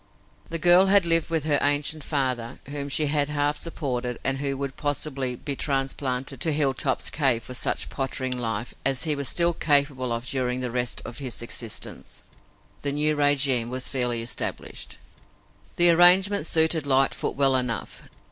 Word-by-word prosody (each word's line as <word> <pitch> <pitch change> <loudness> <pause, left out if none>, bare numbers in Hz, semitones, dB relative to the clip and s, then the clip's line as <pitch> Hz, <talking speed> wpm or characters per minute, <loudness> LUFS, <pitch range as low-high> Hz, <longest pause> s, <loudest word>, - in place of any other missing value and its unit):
The 165 - -3
girl 175 +3 +5
had 195 -1 +4
lived 165 -1 +3
with 165 -3 -1
her 150 -2 +1
ancient 145 +1 0
father, 130 -5 -2
whom 140 0 -5
she 150 +2 +2
had 145 0 0
half 145 0 0
supported 125 -7 -3
and 135 0 +1
who 140 -1 -3
would, 140 -1 -5
possibly, 140 -3 -3
be 140 +3 -5
transplanted 135 -2 -3
to 160 - 0
Hilltop's 135 -2 0
cave 130 -6 +1
for 125 - -8
such 125 - -2
pottering 130 -1 -3
life 115 -2 -4
as 135 -2 +1
he 155 -2 0
was 140 -2 -3
still 170 0 +2
capable 140 -5 +1
of 115 +1 -3
during 125 -1 -2
the 125 -2 -3
rest 125 -1 -2
of 120 - -8
his 130 -4 -5
existence. 115 -1 -5 0.6
The 140 -1 -2
new 150 +1 +1
régime 140 -5 +2
was 130 +1 -2
fairly 120 -3 -1
established. 115 - -4 0.8
The 175 0 +5
arrangement 180 +1 +6
suited 160 -2 +2
Lightfoot 135 0 +1
well 135 -1 +3
enough. 125 -3 -2
140 Hz, 165 wpm, -24 LUFS, 125-150 Hz, 0.8 s, arrangement